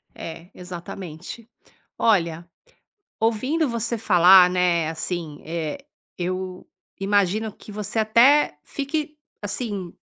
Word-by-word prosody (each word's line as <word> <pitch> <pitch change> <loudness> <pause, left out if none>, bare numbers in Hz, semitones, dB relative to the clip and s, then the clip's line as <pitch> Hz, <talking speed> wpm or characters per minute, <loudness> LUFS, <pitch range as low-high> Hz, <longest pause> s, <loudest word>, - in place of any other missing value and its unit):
É, 165 +2 -8
exatamente. 180 +4 -8 0.5
Olha, 170 -6 +1 0.7
ouvindo 255 +8 +1
você 235 0 -2
falar, 185 -3 +7
né, 175 -3 +2
assim, 160 -2 -5
eh, 165 - -3 0.4
eu 185 +1 -4 0.3
imagino 205 +2 +1
que - - -14
você 210 +1 -4
até 235 - +4
fique 300 +2 -3 0.3
assim 205 -4 -4
190 Hz, 95 wpm, -23 LUFS, 175-225 Hz, 0.7 s, falar